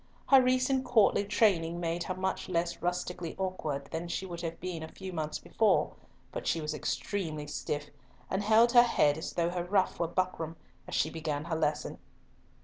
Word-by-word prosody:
Her 270 -1 +8
recent 255 +1 +2
courtly 225 -5 +4
training 175 -6 +2
made 170 0 -2
her 185 - -3
much 190 0 -2
less 170 -1 0
rustically 180 -1 -3
awkward 155 -7 -3
than 165 +2 -3
she 180 +2 -3
would 170 -2 -6
have 165 -1 -4
been 180 -2 -4
a 160 - -5
few 190 +3 -8
months 155 -2 -2
before, 220 -2 +2 0.4
but - - -5
she 165 - +1
was 155 -1 -3
extremely 155 -1 -3
stiff, 145 0 -4 0.4
and 190 - -1
held 220 +3 +5
her 240 -1 +9
head 150 -11 +3
as 160 - -5
though 170 0 +1
her 175 -1 -2
ruff 185 +1 +1
were 170 - +1
buckram, 170 -2 -2 0.3
as - - -4
she 155 - +1
began 155 -2 -3
her 170 -1 -2
lesson. 155 -1 -1
175 Hz, 185 wpm, -30 LUFS, 160-195 Hz, 0.4 s, her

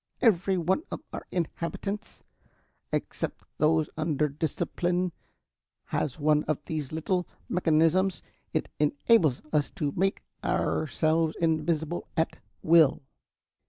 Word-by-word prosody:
"Every 195 -4 +3
one 180 - +1
of - - -5
our - - -6
inhabitants, 185 +5 -4 0.7
except - - -3
those 155 0 +3
under 155 -2 +1
discipline, 175 +4 -1 0.7
has 145 +1 -2
one 150 0 +3
of 150 -1 -1
these 150 -4 -4
little 175 +3 -1 0.2
mechanisms. 170 +1 +2 0.3
It - - 0
enables 150 - +3
us 150 -2 +2
to 150 -7 -1
make 195 +3 +1 0.2
ourselves 155 +2 +1
invisible 160 0 0
at 160 - +1 0.3
will. 160 -4 +5
160 Hz, 105 wpm, -28 LUFS, 150-180 Hz, 0.7 s, will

